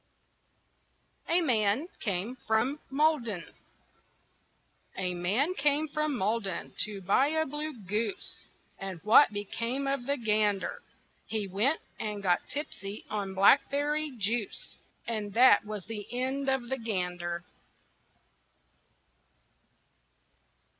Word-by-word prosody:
A 340 Hz, +2 st, +5 dB
MAN 235 Hz, 0 st, +2 dB
CAME 205 Hz, +4 st, -2 dB
FROM 245 Hz, +7 st, +1 dB
MALDEN 270 Hz, -, +1 dB, 1.5 s
A 180 Hz, -1 st, -1 dB
man 205 Hz, -, +1 dB
came 295 Hz, -1 st, +2 dB
from 305 Hz, -2 st, -1 dB
Malden 200 Hz, -3 st, -1 dB
to 205 Hz, -2 st, -7 dB
buy 200 Hz, +9 st, +3 dB
a 315 Hz, +1 st, +1 dB
blue 300 Hz, +2 st, -3 dB
goose. 215 Hz, -, -3 dB, 0.3 s
And 190 Hz, -3 st, -5 dB
what 215 Hz, +6 st, +7 dB
became 230 Hz, +6 st, -3 dB
of 275 Hz, -2 st, -1 dB
the 280 Hz, 0 st, +1 dB
gander? 210 Hz, -3 st, +1 dB, 0.5 s
He 215 Hz, -3 st, -2 dB
went 220 Hz, -, +1 dB, 0.2 s
and 210 Hz, -2 st, -4 dB
got 180 Hz, -2 st, +1 dB
tipsy 210 Hz, -8 st, -5 dB
on 200 Hz, -2 st, -3 dB
blackberry 285 Hz, +8 st, +4 dB
juice, 220 Hz, +1 st, -2 dB, 0.3 s
And 215 Hz, -3 st, -3 dB
that 240 Hz, -4 st, +7 dB
was 210 Hz, -3 st, -5 dB
the 215 Hz, -2 st, -6 dB
end 265 Hz, +2 st, -1 dB
of 265 Hz, -3 st, 0 dB
the 265 Hz, 0 st, -2 dB
gander. 180 Hz, -5 st, -2 dB
225 Hz, 105 wpm, -30 LUFS, 200-275 Hz, 1.5 s, what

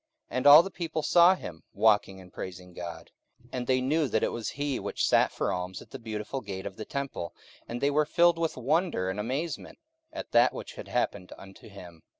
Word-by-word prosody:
44:003:009 -, -, -2 dB
And 135 Hz, -, +2 dB
all 150 Hz, +3 st, +11 dB
the 195 Hz, -, -6 dB
people 160 Hz, -3 st, -3 dB
saw 175 Hz, +3 st, +6 dB
him 80 Hz, -, -9 dB
walking 105 Hz, -3 st, +2 dB
and 90 Hz, -1 st, -15 dB
praising 90 Hz, -1 st, -8 dB
God: 85 Hz, -1 st, -8 dB, 0.3 s
44:003:010 120 Hz, -, -23 dB
And 125 Hz, -1 st, -3 dB
they 130 Hz, -1 st, +2 dB
knew 150 Hz, +4 st, +1 dB
that 110 Hz, -2 st, 0 dB
it -, -, +1 dB
was 115 Hz, -2 st, -4 dB
he 140 Hz, -2 st, -2 dB
which 100 Hz, 0 st, -1 dB
sat -, -, +4 dB
for -, -, -1 dB
alms 90 Hz, 0 st, -4 dB
at -, -, -15 dB
the -, -, -7 dB
Beautiful 110 Hz, +3 st, -5 dB
gate 95 Hz, -3 st, -6 dB
of 95 Hz, -, -6 dB
the 110 Hz, -, -7 dB
temple: 135 Hz, -, -5 dB, 0.3 s
and 120 Hz, -, -5 dB
they 140 Hz, -, +2 dB
were 150 Hz, +1 st, +2 dB
filled 170 Hz, 0 st, +4 dB
with 165 Hz, -4 st, -1 dB
wonder 140 Hz, -, 0 dB
and 100 Hz, -, -5 dB
amazement 135 Hz, +9 st, -4 dB, 0.3 s
at -, -, -7 dB
that 120 Hz, +2 st, +5 dB
which -, -, -7 dB
had -, -, -9 dB
happened 90 Hz, -3 st, -2 dB
unto 95 Hz, +2 st, -13 dB
him. 90 Hz, -5 st, -12 dB
120 Hz, 220 wpm, -28 LUFS, 95-145 Hz, 0.3 s, all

